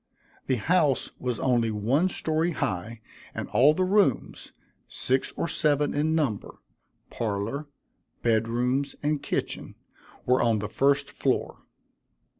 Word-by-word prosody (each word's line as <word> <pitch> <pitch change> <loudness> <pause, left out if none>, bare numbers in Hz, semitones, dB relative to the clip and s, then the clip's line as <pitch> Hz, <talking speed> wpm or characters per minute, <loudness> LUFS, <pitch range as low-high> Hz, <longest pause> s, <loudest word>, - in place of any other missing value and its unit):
The 130 - +2
house 150 - +1
was 125 -3 -2
only 120 -3 +2
one 120 - +1
story 160 0 0
high, 110 0 -3 0.3
and - - -4
all 145 +5 +5
the 185 - +1
rooms, 195 - +1 0.4
six 130 +1 -1
or - - -1
seven 145 -3 +1
in 155 +2 +1
number, 135 -11 -2 0.5
parlor, 115 +7 -3 0.6
bed 115 -1 +2
rooms, 125 +4 -1
and 150 0 0
kitchen, - - -3 0.5
were 125 +1 +3
on 115 -2 +3
the 105 0 -3
first 140 +6 +1
floor. - - -1
130 Hz, 125 wpm, -26 LUFS, 115-150 Hz, 0.6 s, all